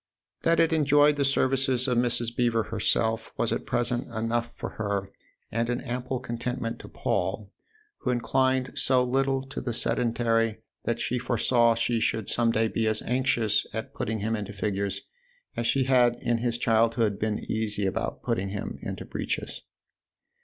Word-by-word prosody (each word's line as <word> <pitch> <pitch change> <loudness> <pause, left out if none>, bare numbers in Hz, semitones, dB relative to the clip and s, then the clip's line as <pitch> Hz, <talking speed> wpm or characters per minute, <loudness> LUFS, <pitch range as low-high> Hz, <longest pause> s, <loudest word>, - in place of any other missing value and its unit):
That 165 0 +3
it 165 -1 +4
enjoyed 145 -1 +5
the 145 - +1
services 135 -1 +2
of 125 - +1
Mrs. 120 -1 0
Beever 120 -2 +2
herself 110 +1 0
was - - +1
at - - -4
present 120 +1 0
enough 115 0 -2
for - - -5
her - - -18
4 110 - -2
THE 100 0 +1
OTHER 100 - -4
HOUSE 100 - -21 0.4
and 115 +1 0
an 120 0 -1
ample 125 +1 -3
contentment 120 -1 -3
to - - -10
Paul, - - -2 0.5
who 130 - -3
inclined 130 +1 +1
so 130 -1 +4
little 135 +1 +1
to 135 - -6
the 120 -2 -3
sedentary 115 -1 +1 0.2
that 115 0 0
she 125 - -1
foresaw 120 -1 +3
she 120 0 +1
should 110 -1 0
some 120 -1 +3
day 115 0 +2
be 110 0 0
as 110 0 +1
anxious 120 -4 +2
at 120 +5 -4
putting 110 -5 -2
him 110 +2 0
into 105 -2 -5
figures 100 -1 -2 0.5
as 120 - -1
she 135 +2 +2
had 125 -2 +4
in 120 -1 0
his 120 0 0
childhood 115 -2 +2
been 110 -1 0
easy 105 -2 -2
about - - -2
putting 95 +1 -1
him 100 +1 -5
into - - -5
breeches. - - -3
120 Hz, 175 wpm, -27 LUFS, 110-125 Hz, 0.5 s, enjoyed